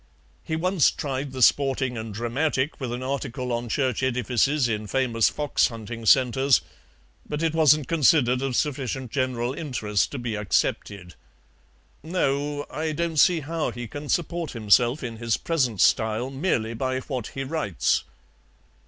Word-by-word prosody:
He 160 - -3
once 180 -1 +3
tried 135 -1 -4
the 130 -1 0
SPORTING 135 -2 +3
AND 110 -2 -6
DRAMATIC 130 +5 -1
with 125 -3 -3
an 120 +1 -4
article 130 -1 -3
on 120 0 -3
church 130 -1 0
edifices 130 +2 +1
in 110 -2 -3
famous 120 -2 +2
fox 150 -1 +1
hunting 115 0 -7
centres, 130 +2 +4 0.7
but 150 +2 -3
it 165 -1 +1
wasn't 155 -3 +4
considered 135 -5 +3
of 135 -2 -2
sufficient 130 -4 -2
general 130 -2 -1
interest 125 -9 -1
to - - -3
be 120 -2 -3
accepted. 100 -2 -1 0.9
No, 145 -3 -1
I 155 0 -2
don't 165 +1 -2
see 170 +2 +5
how 160 +2 -2
he 120 -1 -6
can 145 +6 -8
support 170 -1 -1
himself 120 +4 +3
in 115 -2 -5
his 115 -1 0
present 130 - -1
style 110 +3 +2
merely 130 -6 -1
by 130 +2 -2
what 130 -4 -4
he 135 - -2
writes." 130 - 0
130 Hz, 150 wpm, -25 LUFS, 120-145 Hz, 0.9 s, see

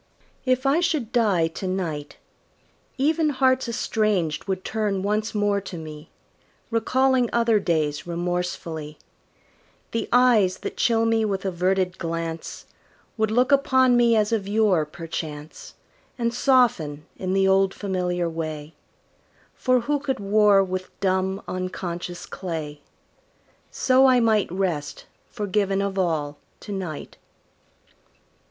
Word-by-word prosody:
If 255 +1 +1
I 275 +4 +3
should 305 -10 0
die 205 -9 +2
to 185 +3 -6
night, 165 -6 -3 0.8
Even 310 +3 +2
hearts 260 -2 +2
estranged 210 -8 0
would 190 -1 -3
turn 210 -3 -1
once 215 +2 -1
more 205 -1 +1
to 190 -2 -8
me, 155 -1 -9 0.6
Recalling 255 +2 +2
other 230 -2 +3
days 155 -5 -1
remorsefully; 170 -3 -3 0.9
The 230 - -2
eyes 230 -7 +4
that - - -5
chill 225 -1 +2
me 225 -1 +2
with 200 -2 -2
averted 185 0 0
glance 165 -1 -4 0.5
Would 220 -1 0
look 250 +5 +2
upon 260 -2 +4
me 235 -1 +4
as 215 0 +2
of 210 -4 -1
yore, 200 -7 +2
perchance, 155 -2 -7 0.4
And 235 -1 -1
soften, 225 - +2
in 185 0 -2
the 195 0 +3
old 190 0 +3
familiar 180 -3 -2
way; 155 -2 -5 0.8
For 255 -1 +1
who 290 +5 0
could 275 -2 -2
war 205 -1 +4
with 185 0 -4
dumb, 190 0 0
unconscious 180 -1 -5
clay? 155 -5 -6 0.9
So 260 +1 +4
I 255 -1 +5
might 220 -6 +2
rest, 180 -6 -3 0.2
forgiven 200 -2 -1
of 200 -1 -1
all, 150 -5 -1 0.2
to 210 - -8
night. 180 -6 -6
195 Hz, 125 wpm, -24 LUFS, 175-230 Hz, 0.9 s, I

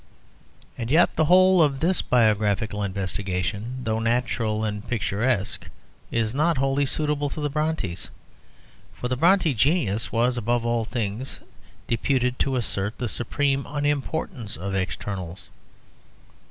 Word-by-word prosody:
And 115 -1 -3
yet 160 +5 +4
the 155 - +3
whole 185 +2 +6
of 140 -3 +3
this 175 +4 +2
biographical 105 -3 +2
investigation, 100 +4 -2
though 110 -2 0
natural 115 -2 0
and 105 -1 -4
picturesque, 105 -1 -1 0.4
is 115 -1 0
not 155 +3 +2
wholly 135 +1 +1
suitable 150 0 0
to 155 - -6
the 145 -1 -1
Brontës. 150 - -2 0.9
For 125 - -4
the 125 - +1
Brontë 170 -1 +4
genius 115 - +1
was 120 +2 +2
above 120 +1 0
all 115 -1 +1
things 115 +2 -3 0.5
deputed 125 +1 0
to 135 -1 +1
assert 105 -3 -2
the 125 - -2
supreme 135 +4 0
unimportance 145 - -2
of 95 +3 -4
externals. 95 -1 -4
120 Hz, 125 wpm, -25 LUFS, 105-145 Hz, 0.9 s, whole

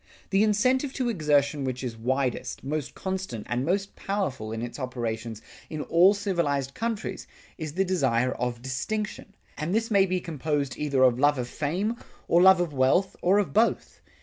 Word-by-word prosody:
The 195 +1 +4
incentive 255 +6 +2
to 255 -3 -1
exertion 145 -7 +1
which 130 -1 -3
is 120 -3 -4
widest, 130 +2 -2
most 145 0 -3
constant, 190 - -4
and 120 +1 -1
most 195 +5 -1
powerful 145 - -3
in 115 +1 -4
its 120 +4 -6
operations 115 -3 -4 0.3
in 155 -2 -4
all 180 +5 +5
civilized 150 -9 -1
countries, 230 -1 -4 0.3
is 155 -2 -5
the 190 +3 +1
desire 130 -9 +1
of 120 -1 -3
distinction; 200 +10 -4 0.2
and 170 +6 -1
this 225 0 0
may 195 -2 +5
be 185 0 0
composed 150 -5 -2
either 140 -3 +1
of 125 -1 +4
love 145 +1 +4
of 125 -1 -2
fame 185 - -2 0.3
or 170 - +4
love 190 0 +7
of 175 -4 -1
wealth 135 +9 +2
or 185 +3 +4
of 205 - 0
both. 225 +3 +1
150 Hz, 175 wpm, -27 LUFS, 130-195 Hz, 0.3 s, love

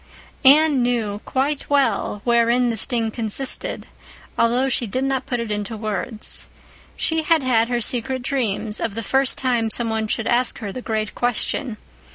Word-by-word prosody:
Anne 290 0 +6
knew 225 -4 -1
quite 275 +2 -1
well 230 -7 +1
wherein 235 +1 +3
the - - -3
sting 225 0 -1
consisted, 230 +4 0 0.5
though 245 +3 +2
she 245 -2 0
did 255 +6 -2
not 270 -1 -1
put 245 - -2
it 230 -2 -4
into 210 +2 -3
words. 215 +1 -2 0.5
She 320 0 0
had 315 -1 +2
had 230 -3 +2
her 240 0 -1
secret 250 +3 -2
dreams 225 -5 -1
of 215 -3 -3
the 230 - -4
first 270 +3 +1
time 240 -4 +1
some 230 0 -1
one 220 0 -1
should 220 +1 -1
ask 245 0 +2
her 205 -4 -5
the 255 - -6
great 215 -3 -2
question. 245 0 -1
240 Hz, 170 wpm, -21 LUFS, 220-260 Hz, 0.5 s, Anne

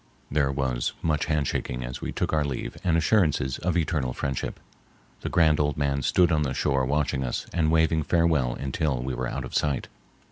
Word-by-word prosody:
There 70 -1 +2
was 65 -3 -1
much 80 -1 +1
hand 75 -3 0
shaking 60 0 -3
as 60 +1 -6
we - - -3
took - - -2
our 75 -1 +3
leave 65 -4 -4
and 85 -2 +2
assurances 80 - +2
of 90 0 0
eternal 75 -6 0
friendship. 70 -1 -3 0.6
The - - -4
grand 80 -3 +4
old 75 -2 +1
man 70 -1 0
stood 85 +6 +3
on 75 -2 +2
the 65 -3 -1
shore 70 -3 +1
watching 70 -2 0
us - - -3
and 80 -2 +2
waving 80 0 +3
farewell 80 -6 +2
until 70 0 -1
we 65 0 -3
were 65 +1 -2
out - - -4
of - - -10
sight. 75 -3 0
75 Hz, 200 wpm, -26 LUFS, 65-80 Hz, 0.6 s, grand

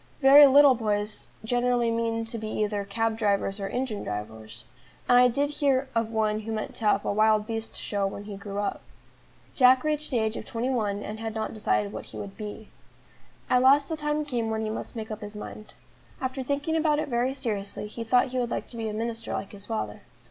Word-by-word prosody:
Very 285 +1 +9
little 280 0 +7
boys 210 -2 -2 0.2
generally 245 0 +1
mean 230 0 -1
to 230 0 -6
be 220 - -5
either 210 -1 -1
cab 225 +3 -1
drivers 200 -2 0
or 195 - -3
engine 245 -2 -3
drivers; 110 +3 -7 0.4
and 245 - +5
I 250 - +7
did 285 +4 0
hear 275 -2 +1
of 230 -1 0
one 215 -1 0
who 220 +1 -6
meant 215 -1 -3
to 225 - -4
have 205 -1 +3
a - - 0
wild 215 0 +3
beast 225 0 -5
show 200 -2 -1
when 200 +1 -6
he 205 -1 -7
grew 200 0 -7
up. 205 0 -2 0.7
Jack 255 -1 +5
reached 305 0 +1
the 255 - 0
age 220 0 0
of - - -6
twenty 240 +3 -2
one, 205 -5 -1
and 215 +1 -6
had 225 -1 -4
not 220 0 -3
decided 210 -1 0
what - - -6
he - - -10
would 195 -1 -7
be. 215 0 -8 0.8
At 250 - +3
last 275 +2 +5
the 320 - -1
time 300 0 -1
came 240 -5 -2
when 220 0 -1
he 215 -1 -2
must 220 - -6
make 220 -1 -5
up 215 +1 -6
his 210 0 -8
mind. 215 0 -9 0.5
After 260 +1 -3
thinking 285 +4 -1
about 310 -2 +2
it 305 - -1
very 250 +1 0
seriously, 210 -7 -3
he 220 +2 -6
thought 250 +3 +3
he 255 0 -2
would 240 -1 -1
like - - -3
to 235 - -8
be 225 -1 -2
a - - -5
minister 225 +1 -4
like 200 - -4
his 205 -1 -11
father. 105 -1 -3
225 Hz, 225 wpm, -27 LUFS, 210-255 Hz, 0.8 s, Very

